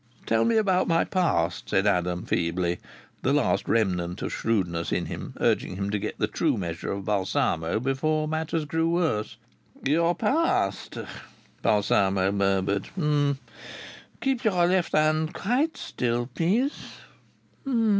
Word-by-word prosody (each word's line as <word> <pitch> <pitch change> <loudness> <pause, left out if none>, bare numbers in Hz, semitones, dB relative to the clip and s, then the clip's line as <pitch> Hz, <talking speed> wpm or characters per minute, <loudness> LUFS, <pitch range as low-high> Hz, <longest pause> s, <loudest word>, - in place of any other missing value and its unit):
"Tell 115 0 +2
me 230 -1 +3
about 190 -4 +2
my 165 0 +3
past," 90 - 0
said 95 - +2
Adam, 90 -3 +1
feebly, 85 +1 0 0.4
the - - +2
final - - +2
remnant 90 -5 0
of - - -3
shrewdness 90 -7 -1
in - - 0
him - - -7
urging - - +1
him 100 +1 -2
to 105 - 0
get - - -4
the - - +1
true - - 0
measure 85 -3 -4
of 100 -1 -4
Balsamo 95 -3 0
before 155 +5 0
matters 160 0 -1
grew 160 +2 0
worse. 160 -11 0 0.5
"Your 165 +5 +3
past?" 225 - 0 0.6
Balsamo 100 -2 +2
murmured. 100 0 +1 1.3
"Keep 265 -3 0
your 185 -6 +3
left 180 0 +1
hand 155 +1 +2
quite 265 - 0
still, 120 0 -2
please. 225 - +1
115 Hz, 130 wpm, -26 LUFS, -, 1.3 s, me